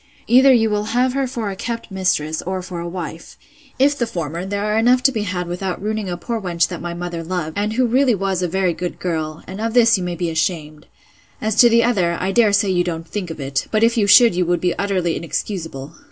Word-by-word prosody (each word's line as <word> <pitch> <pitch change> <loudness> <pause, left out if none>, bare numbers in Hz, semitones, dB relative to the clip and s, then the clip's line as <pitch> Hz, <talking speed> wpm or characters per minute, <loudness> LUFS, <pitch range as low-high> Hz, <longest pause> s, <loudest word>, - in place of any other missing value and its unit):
Either 260 +3 +6
you 230 -3 +4
will 210 -1 -1
have 250 0 +2
her 270 -1 0
for 230 -5 -4
a - - -6
kept 230 +2 -5
mistress, 160 -5 -1
or 185 0 -4
for 180 -1 -6
a 170 0 -5
wife. 170 -2 -7 0.4
If 280 +2 +3
the 240 -4 -1
former, 170 0 -4
there 200 +1 -2
are 210 0 0
enough 250 +3 +3
to 270 - +5
be 225 -4 -2
had 185 -3 -3
without 180 +1 -4
ruining 215 -1 -3
a 175 - -3
poor 230 +5 -4
wench 170 -3 0
that 175 - -6
my 175 0 -5
mother 175 -1 -5
loved, 165 -2 -4
and 210 +1 -1
who 255 +2 +2
really 250 0 +3
was 195 -1 -1
a 180 - 0
very 185 0 0
good 175 +2 -5
girl: 160 -3 -3
and 190 +3 -7
of 225 +1 -2
this 230 -3 +5
you - - -3
may 175 -1 -3
be 170 -1 -2
ashamed. 155 -2 -3 0.5
As 220 0 -1
to 240 - +7
the 230 0 +4
other, 180 -8 +1
I 190 - -1
dare 220 0 +4
say 200 -1 +2
you 175 -1 +2
don't 165 -2 -4
think 190 -2 -5
of 160 - -7
it; 135 -1 -2
but 215 0 +1
if 230 0 +3
you 210 -3 +2
should, 215 +1 +7
you 180 +1 +1
would 175 0 +1
be 180 -1 0
utterly 185 -3 -1
inexcusable. 165 -5 -5
190 Hz, 250 wpm, -20 LUFS, 170-225 Hz, 0.5 s, to